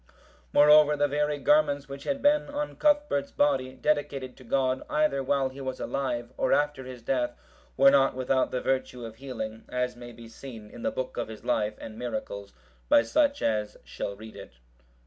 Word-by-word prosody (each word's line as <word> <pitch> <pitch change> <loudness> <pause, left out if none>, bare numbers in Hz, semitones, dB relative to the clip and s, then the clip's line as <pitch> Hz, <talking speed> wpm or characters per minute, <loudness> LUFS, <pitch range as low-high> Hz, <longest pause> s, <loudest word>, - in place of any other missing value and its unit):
Moreover, 150 - +6
the 145 0 +3
very 150 +1 0
garments 145 - +2
which 140 0 -9
had 275 -1 -2
been 295 +1 +4
on 290 +1 -3
Cuthbert's 295 - +2
body, 135 -3 +1
dedicated 140 -2 -1
to 130 - -14
God, 130 +1 0
either 150 -2 +1
while 135 0 +1
he 135 +1 -10
was 130 -1 -4
alive, 125 -3 -3
or 130 - +2
after 145 -3 0
his 125 -2 -9
death, 125 -1 0 0.4
were 135 0 +7
not 135 -2 +4
without 130 0 +1
the 125 - -2
virtue 125 -2 -2
of 110 0 -9
healing, 115 -4 -6
as 125 0 -1
may 120 0 -10
be 115 0 -12
seen 115 -2 -10
in - - -10
the - - 0
book 130 0 -5
of 120 - -2
his 110 -1 -10
life 105 -1 0
and 110 0 -9
miracles, 105 -4 -5 0.4
by 115 - +6
such 285 - +1
as 105 -1 -1
shall 100 - -5
read 110 +2 -11
it. - - -11
130 Hz, 185 wpm, -28 LUFS, 120-145 Hz, 0.4 s, were